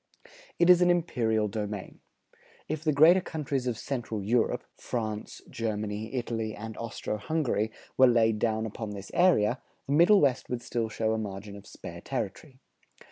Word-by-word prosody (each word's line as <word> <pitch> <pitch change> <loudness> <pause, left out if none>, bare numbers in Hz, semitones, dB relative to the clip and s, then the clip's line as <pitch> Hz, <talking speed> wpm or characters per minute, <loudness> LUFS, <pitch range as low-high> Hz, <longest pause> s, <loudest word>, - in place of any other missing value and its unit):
It 170 - +4
is 180 -1 +7
an 180 - +5
imperial 115 -11 +1
domain. 105 -2 -5 0.7
If 155 0 -3
the 155 - +2
greater 160 +6 +6
countries 140 -6 -3
of 120 -3 -1
Central 115 -5 -4
Europe, 115 +3 +1
France, 110 -3 -4
Germany, 110 0 -3
Italy, 115 -3 -2
and 110 +1 -7
Austro 115 -2 -4
Hungary, 120 -4 -1 0.3
were 130 - +8
laid 115 -3 +3
down 110 0 0
upon 110 -1 -5
this 100 -1 -9
area, 130 - +3 0.2
the 140 - -1
Middle 175 +7 +6
West 135 -5 +1
would 120 -1 -3
still 115 -2 -2
show 110 0 0
a 110 - -1
margin 100 -1 -6
of 100 - -12
spare - - -9
territory. 130 - -5
115 Hz, 160 wpm, -28 LUFS, 110-140 Hz, 0.7 s, were